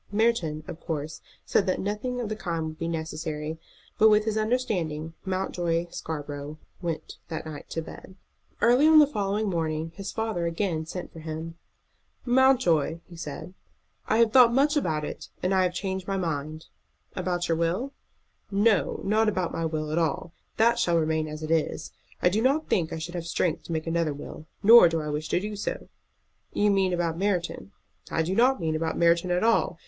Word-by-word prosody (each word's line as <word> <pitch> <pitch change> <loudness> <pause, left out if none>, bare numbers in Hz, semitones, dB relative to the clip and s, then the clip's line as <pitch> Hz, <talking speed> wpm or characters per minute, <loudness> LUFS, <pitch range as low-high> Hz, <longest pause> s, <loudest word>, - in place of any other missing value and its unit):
Merton, 205 -9 +1
of 160 - -7
course, 155 -2 -5 0.2
said 200 - +2
that 185 - +1
nothing 210 +5 -3
of 240 - -2
the 215 - -3
kind 170 -6 -3
would 155 0 -7
be 165 - -2
necessary; 160 -1 -4 0.4
but 220 - +7
with 210 0 +4
this 220 -1 -1
understanding 190 -9 -1
Mountjoy 175 -3 -1
Scarborough 145 -1 -6 0.2
went 165 -3 -4
that 160 -1 -5
night 155 -2 -8
to 165 - -3
bed. 185 - -11 0.5
Early 250 +6 +5
on 315 0 +7
the 300 - +9
following 210 -5 -1
morning 160 -3 -2
his 195 -1 -5
father 220 -7 -2
again 165 -2 -2
sent 180 +2 -6
for 165 - -10
him. 160 +1 -6 0.7
"Mountjoy," 245 - +3
he 175 - -12
said, 165 +2 -7 0.5
"I 220 - +2
have 230 -1 +4
thought 250 -3 +8
much 290 +3 +3
about 155 - 0
it, - - -7
and 185 +2 +1
I 190 - +4
have 180 -1 +1
changed 190 -1 -3
my 195 -1 -1
mind." 155 -3 -3 0.5
"About 180 -1 -1
your 165 - +1
will?" 185 +12 -1 0.6
"No, 205 0 +2
not 215 +2 +3
about 185 -4 -2
my 165 - -2
will 155 -1 -3
at 160 - +1
all. 165 +1 -1 0.2
That 235 +2 +4
shall 175 -7 +2
remain 160 -1 0
as 155 +1 -7
it 155 - -3
is. 165 -2 0 0.3
I 180 - +6
do 210 +5 0
not 275 +6 +1
think 165 -3 +1
I - - -3
should 165 +2 -6
have 170 -2 -4
strength 165 0 -1
to - - -7
make 160 -1 -2
another 165 -3 0
will, 150 +2 -9 0.2
nor 225 -4 +9
do 165 0 -1
I 150 -1 -4
wish 150 +1 -3
to - - +2
do 210 +2 -5
so." 205 - -4 0.6
"You 205 0 +3
mean 195 -2 +2
about 170 -2 -1
Merton?" 180 - -1 0.4
"I 160 - 0
don't 235 +10 +3
mean 160 -2 -1
about 160 +1 -2
Merton 170 +1 +3
at 180 +2 +1
all. 225 -6 +2
175 Hz, 190 wpm, -27 LUFS, 160-210 Hz, 0.7 s, the